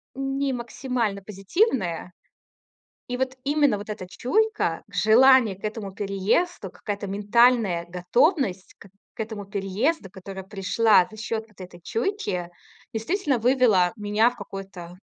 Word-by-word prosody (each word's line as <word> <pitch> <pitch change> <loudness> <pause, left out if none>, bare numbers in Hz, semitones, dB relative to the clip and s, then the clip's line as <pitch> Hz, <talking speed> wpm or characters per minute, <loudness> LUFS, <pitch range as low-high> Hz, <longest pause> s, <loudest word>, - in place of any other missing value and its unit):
не 270 0 -1
максимально 235 -4 -2
позитивная. 195 - -1 1.0
И 250 - -2
вот 260 0 -2
именно, 290 -4 +3
вот 205 +2 -8
эта 205 -4 -6
чуйка, 430 - 0
желание 230 -2 +5
к 200 - -23
этому 210 -2 -4
переезду, 200 - -1
какая-то 205 -1 -5
ментальная 205 -2 +3
готовность 195 - +1
к - - -14 0.3
к - - -8
этому 215 -2 -5
переезду, 200 - -1
которая 190 +1 -8
пришла 200 0 +3
за 220 - -13
счёт 220 0 -3
вот 210 -3 -24
этой 180 -1 -10
чуйки, 205 - -2 0.4
действительно 275 - 0
вывела 230 -7 +3
меня 210 +2 +2
в 245 - -6
какое-то 195 -4 -9
215 Hz, 125 wpm, -25 LUFS, 195-255 Hz, 1.0 s, желание